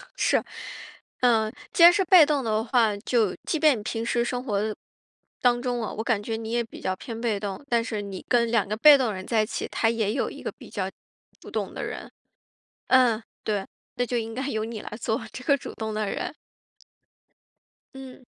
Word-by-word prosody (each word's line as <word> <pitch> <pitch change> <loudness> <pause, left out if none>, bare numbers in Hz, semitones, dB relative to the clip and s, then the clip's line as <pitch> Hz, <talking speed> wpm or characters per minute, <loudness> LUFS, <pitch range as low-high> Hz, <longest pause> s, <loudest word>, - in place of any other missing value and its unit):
是。 - - +2 0.8
嗯， 225 -2 +3 0.2
既 335 - +5
然 345 - +11
是 385 +2 +2
被 350 -3 +8
动 290 -2 0
的 220 -1 0
话， 225 -3 +2
就 215 -2 +1
即 315 - -1
便 300 -6 +5
你 - - -9
平 225 +1 -3
时 235 0 +1
生 245 +1 -3
活 215 -3 -1 0.7
当 245 -1 +3
中 245 -1 -1
了， 225 - -4
我 220 - -3
感 225 -3 +1
觉 225 +1 -3
你 225 0 -6
也 235 0 +1
比 225 - -12
较 185 - -1
偏 230 +2 -7
被 220 -4 0
动， 200 +6 -5
但 235 -1 +2
是 220 -3 -3
你 195 -2 -7
跟 235 -2 +3
2 225 -4 +2
个 210 - -2
被 290 +4 +8
动 245 -6 0
人 185 0 -7
在 225 -2 +2
一 - - -2
起， - - -4
他 225 - +1
也 225 -2 0
有 - - -1
一 - - -10
个 - - -3
比 - - -14
较 - - -3 0.5
主 - - -12
动 - - -3
的 - - -5
人。 - - -6 0.8
嗯， 245 -4 +4 0.2
对。 205 -2 -1 0.3
那 245 - 0
就 245 - -2
应 225 -1 -3
该 265 +2 -3
由 220 -4 -1
你 225 -1 -6
来 - - -8
做 220 0 -1
这 255 - -8
个 280 -2 +4
主 - - -8
动 220 -1 -4
的 215 -1 -1
人。 - - -4 1.6
嗯。 265 -1 -11
230 Hz, 225 characters per minute, -26 LUFS, 215-250 Hz, 1.6 s, 然